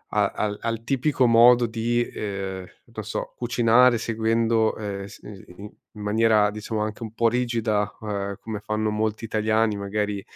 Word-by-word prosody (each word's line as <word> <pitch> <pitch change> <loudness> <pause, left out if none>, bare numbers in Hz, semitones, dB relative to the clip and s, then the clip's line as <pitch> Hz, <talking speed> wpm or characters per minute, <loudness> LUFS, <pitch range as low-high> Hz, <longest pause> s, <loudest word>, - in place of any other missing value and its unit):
a - - +2
al 105 -1 -2
al 115 -1 -3
tipico 135 0 +1
modo 120 +1 +6
di, 115 +1 0
ehm, 95 -4 -5 0.3
non 110 -2 -6
so 110 - -5
cucinare 120 0 +4
seguendo, 115 0 +1
ehm, 100 -2 -5
s 100 - -12
i 105 - -9
s 95 - -15
ni 100 - -10
i 105 - -10 0.2
in 105 - -9
maniera 105 0 +3
diciamo 105 +1 -4
anche 110 +2 -4
un 110 -1 -7
po' 115 0 +2
rigida, 115 -4 0
ehm, 100 -2 -3
come 110 -2 -5
fanno 110 0 -2
molti 110 +1 -2
italiani, 110 -1 +1
magari 100 0 -2
110 Hz, 175 wpm, -24 LUFS, 105-115 Hz, 0.3 s, modo